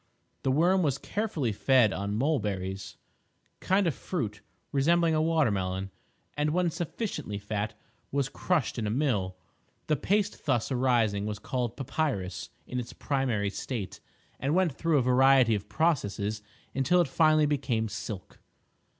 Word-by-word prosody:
The - - 0
worm 175 +7 +4
was 140 -6 +1
carefully 165 - -2
fed 115 0 +4
on 100 +1 -2
mulberries—a 100 - -1 0.7
kind 190 +1 +3
of 165 - +2
fruit 110 - -4 0.3
resembling 165 +4 +3
a 155 - +2
water 160 -6 +3
melon—and, 95 +9 -4
when 175 +2 +1
sufficiently 165 - -4
fat, 105 +1 -3 0.4
was 140 -2 +1
crushed 150 -4 -1
in 110 - -1
a - - 0
mill. 105 -8 0 0.5
The 155 - +2
paste 205 +8 0
thus 125 -2 +1
arising 120 -5 +2
was 105 -1 -3
called 120 +2 -3
papyrus 135 - -2 0.2
in 125 - -3
its 120 0 -6
primary 125 -8 -1
state, 110 -3 -5 0.4
and 140 +4 0
went 185 -3 +3
through 160 +3 +1
a 130 - +3
variety 130 -1 +5
of 105 -1 -3
processes 110 -10 0 0.3
until 155 +7 +3
it 175 - +3
finally 155 +2 +4
became 125 -6 0
"silk." 105 -2 -7
130 Hz, 140 wpm, -29 LUFS, 105-155 Hz, 0.7 s, variety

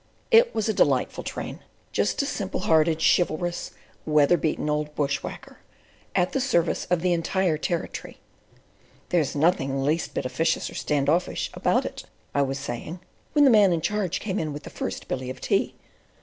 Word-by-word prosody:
It 470 +1 +6
was 220 -1 0
a 220 - +1
delightful 135 -9 +1
train—just - - -3
a - - -2
simple - - -3
hearted, 160 0 +3
chivalrous, 175 0 +1 0.3
weather 150 +2 +4
beaten 155 -3 -1
old 150 0 -1
bush 140 -2 0
whacker, - - -9 0.6
at 180 0 +2
the 270 - 0
service 180 -11 +1
of 180 -2 0
the 180 0 +2
entire 175 0 +1
Territory. 165 +2 -4 0.9
"There's 160 -6 +1
nothing 145 -3 +2
the 135 - -1
least 155 +3 -1
bit - - -2
officious 160 +6 0
or - - -11
standoffish 150 +4 0
about - - +1
it," - - -6 0.3
I 140 - +2
was 135 0 -1
saying, 140 +5 -6 0.3
when 295 -1 +5
the 265 - +7
Man 205 -4 +6
in 165 -2 0
Charge 195 -2 -1
came 205 -1 -2
in 155 -2 -2
with 145 - -7
the - - -9
first - - -5
billy 130 -1 -3
of 130 - -6
tea. - - 0
165 Hz, 175 wpm, -25 LUFS, 145-180 Hz, 0.9 s, the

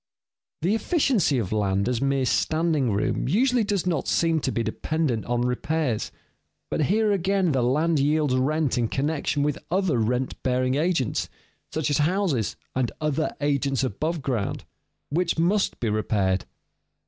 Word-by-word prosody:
The 185 +5 +2
efficiency 225 - +2
of 110 -7 -2
land 100 -2 +1
as 125 -2 0
mere 135 -1 +1
standing 155 -1 +1
room 100 +4 0
usually 245 - +3
does 200 -3 -1
not 165 -6 -1
seem 165 -1 +2
to 135 - -1
be 115 - -1
dependent 125 +2 -1
on 120 0 0
repairs. 125 0 -1 0.6
But 155 - +1
here 215 +4 +2
again 195 -2 +1
the 130 -3 +1
land 150 +6 +2
yields 150 -1 +2
rent 135 0 +1
in 115 - +1
connection 145 +2 -1
with 145 -1 -1
other 180 -7 +1
rent 125 +4 -1
bearing 130 0 +1
agents 150 - 0 0.4
(such 155 -1 -1
as 145 - +2
houses 155 - +1 0.2
and 130 -2 0
other 155 0 -1
agents 140 -2 +1
above 155 - -2
ground), 120 -7 -2 0.5
which 170 +2 0
must 190 +5 +1
be 120 - -1
repaired. 100 -3 0
145 Hz, 150 wpm, -25 LUFS, 125-165 Hz, 0.6 s, usually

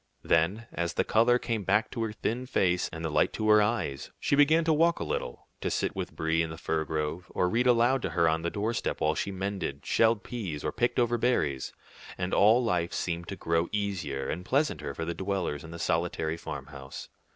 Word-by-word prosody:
Then, 95 +8 +2
as 85 0 -2
the - - +2
color 115 +2 +4
came 115 -4 -2
back 105 +3 +2
to 115 - -4
her 110 -1 -1
thin 120 +4 -3
face 90 -8 +1
and 80 0 -5
the 80 - -2
light - - +3
to 110 - -2
her 105 0 +7
eyes, 105 - -1
she - - +1
began 155 +3 +5
to 160 0 +3
walk 165 +2 +3
a - - -2
little, - - -4
to - - -2
sit - - -1
with - - -5
Brie 80 +1 +1
in 80 - -1
the 80 - -7
fir 80 0 -1
grove, 80 +3 -3
or 90 - +2
read 120 +7 +1
aloud 120 +2 +4
to - - -2
her 85 -2 +2
on 80 0 +1
the 85 - -1
doorstep 110 +5 -2
while 75 0 +2
she - - -2
mended, 95 -7 -4
shelled 115 -3 +3
peas, 95 -12 -5
or 75 - -1
picked 120 +8 0
over 120 -1 +2
berries; 75 - 0 0.5
and 90 +1 -2
all 110 +5 +5
life 90 -6 0
seemed 85 -1 -3
to 100 - -5
grow 85 -1 0
easier 90 -10 -2
and 90 +3 -3
pleasanter 135 - 0
for 80 - -3
the 85 - -2
dwellers 95 -6 -2
in 80 - -10
the 85 - -7
solitary 80 -1 -1
farmhouse. 70 -4 -8
95 Hz, 220 wpm, -29 LUFS, 80-115 Hz, 0.5 s, her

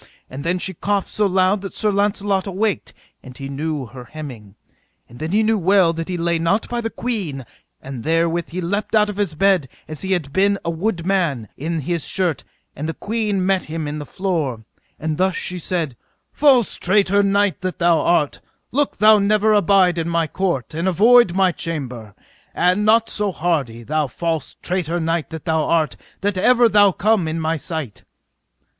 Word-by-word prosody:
And 135 +2 -6
then 170 +3 0
she 190 +1 -2
coughed 200 +3 -1
so 210 -1 +1
loud 190 +1 +2
that 195 - -7
Sir 215 -1 +2
Launcelot 200 -1 0
awaked, 200 +2 -1 0.3
and 130 -2 -12
he 135 - -6
knew 145 0 -3
her 125 +2 -11
hemming. 125 -11 -9 0.5
And 120 - -14
then 155 +1 -3
he 215 +3 +3
knew 220 0 +2
well 185 -1 +4
that 165 +1 -5
he 180 - -2
lay 170 0 0
not 170 +6 +1
by 240 0 -2
the 225 - -2
queen; 190 - -4 0.4
and 135 -4 -7
therewith 165 +1 0
he 180 +2 -4
leapt 200 +6 -2
out 210 -1 +4
of 200 - -10
his 195 -6 -1
bed 185 -5 +2 0.2
as 155 -2 -7
he 190 0 0
had 150 -7 -3
been 200 +1 +3
a 170 - 0
wood 170 0 -2
man, 165 - 0
in 160 +2 -3
his 170 +2 -2
shirt, 180 -6 -1 0.3
and 155 +3 -4
the 165 - -4
queen 210 -3 -1
met 190 -1 +1
him 155 -1 -4
in 150 +1 -4
the 145 - -6
floor; 160 - -2 0.4
and 155 0 -2
thus 190 0 +2
she 180 0 -3
said: 165 -6 -2 0.4
False 265 -6 +3
traitor 200 +1 +2
knight 200 -1 +1
that 185 -1 -3
thou 170 -1 +3
art, 155 -4 +1 0.3
look 285 +3 0
thou 215 +1 +6
never 210 +1 +3
abide 195 -4 +3
in 165 +1 -2
my 170 -1 +1
court, 155 -8 -2
and 165 +4 -2
avoid 210 +1 +5
my 190 -1 +3
chamber, 125 - -6 0.4
and 180 +4 +2
not 225 +2 +4
so 210 -2 0
hardy, 145 -10 -2
thou 155 +3 0
false 165 +4 -3
traitor 175 -2 -1
knight 165 -1 -1
that 160 -2 -8
thou 160 -1 +1
art, 155 -7 +1 0.3
that 200 -1 -1
ever 245 +3 +5
thou 205 -2 +5
come 200 -2 +1
in 160 +1 -2
my 160 0 0
sight. 155 - -6
175 Hz, 190 wpm, -20 LUFS, 155-200 Hz, 0.5 s, thou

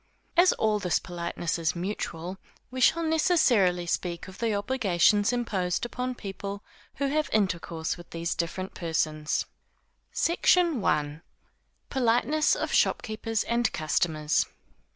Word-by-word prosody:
As 355 +1 +6
all 215 -1 +1
this 180 -4 +1
politeness 170 -1 -3
is 165 0 0
mutual, 180 -1 -4 0.3
we 255 0 -4
shall 335 +6 +4
necessarily 260 - +3
speak 170 0 -2
of 185 +1 -12
the 230 -1 0
obligations 205 -2 +2
imposed 205 -6 -1
upon 250 +1 -3
people 200 -1 -6 0.3
who 280 - -1
have 305 +2 0
intercourse 170 -6 -1
with 175 - -13
these 170 +1 -2
different 185 +3 -3
persons. 155 -2 -1 0.7
SECTION 340 - +2
I. 150 +1 0 0.7
_Politeness 265 +4 +2
of - - -3
Shopkeepers 225 0 +1
and 235 0 +1
Customers. 155 -1 +1
200 Hz, 120 wpm, -27 LUFS, 170-245 Hz, 0.7 s, As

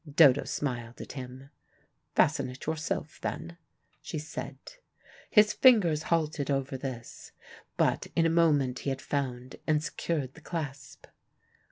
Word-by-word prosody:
Dodo 140 -3 +6
smiled 125 -4 -3
at - - -7
him. 130 +1 -8 0.6
"Fasten - - +3
it 125 +1 -9
yourself, 155 -1 -3
then," 170 0 -4 0.4
she - - -5
said. 155 +1 -6 0.7
His 210 -1 +6
fingers 195 - +5
halted 155 -4 0
over 135 0 0
this, 130 -3 -7 0.4
but - - +2
in 165 - +4
a - - +4
moment 145 -6 +3
he - - -2
had 135 0 -2
found 130 -3 -3
and 155 -1 +2
secured 145 -6 -2
the 160 - -15
clasp. 145 -6 -6
145 Hz, 135 wpm, -29 LUFS, 130-160 Hz, 0.7 s, Dodo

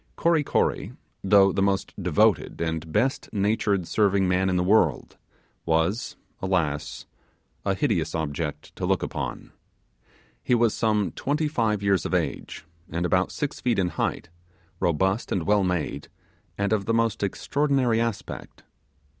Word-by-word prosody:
Kory 165 -3 +2
Kory, - - 0 0.3
though 100 0 +5
the 95 - -1
most 100 -1 0
devoted 90 -4 +2
and 80 -1 -3
best 120 +9 0
natured 100 -3 0
serving 100 -3 +2
man 90 +1 +2
in 90 - +1
the 90 - +2
world, 90 - +2 0.5
was, 80 +7 0 0.3
alas! 85 -6 -1 0.6
a 100 -1 +1
hideous 95 - 0
object 75 -1 -4
to - - -2
look - - +1
upon. - - -5 0.9
He 125 - +2
was 115 -2 +3
some 105 -3 +1
twenty 150 +2 -1
five 110 -8 0
years 100 -5 +2
of - - -1
age, - - -3 0.2
and 85 +2 -2
about 90 +1 +1
six 145 -1 -4
feet 120 -4 +1
in 90 -2 +1
height, 85 - -3 0.5
robust 95 +6 0
and 90 - 0
well 105 -1 +3
made, 85 -5 -2 0.5
and 100 +1 0
of 100 -2 0
the 115 - +1
most 115 -2 +1
extraordinary 130 +2 +1
aspect. 115 -3 -5
100 Hz, 145 wpm, -25 LUFS, 90-115 Hz, 0.9 s, though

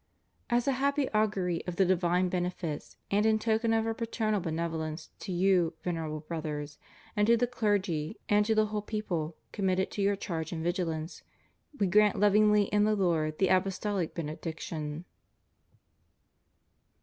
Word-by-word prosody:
As 240 +1 +1
a - - +4
happy 280 +1 +1
augury 200 -5 0
of 180 - -3
the 190 - +4
divine 180 0 +2
benefits, 180 -4 -3
and 205 +1 +3
in 220 0 +4
token 225 +1 +1
of 225 0 +2
Our 225 - 0
paternal 220 -2 -1
benevolence, 160 -2 -3
to 195 - -6
you. 180 -2 +2
Vener 165 -3 -2
able 155 0 -4
Brothers, 150 -2 -5 0.4
and 210 0 +2
to 235 0 +6
the 245 - +2
clergy 205 -8 -1
and 210 0 +4
to 220 - +2
the 215 0 +4
whole 210 0 -3
people 180 -7 -3 0.2
committed 190 -1 0
to 205 - -3
your 200 +1 +3
charge 165 -5 -4
and 160 -2 -4
vigilance, 170 -2 -2 0.6
We 200 - +3
grant 210 +2 +4
lov 205 0 +4
ingly 210 -1 +5
in 210 0 +3
the 215 0 +3
Lord 160 -5 +1
the 190 - +2
Apostolic 190 -1 0
Benediction. 160 0 -5
185 Hz, 160 wpm, -30 LUFS, 165-210 Hz, 0.6 s, to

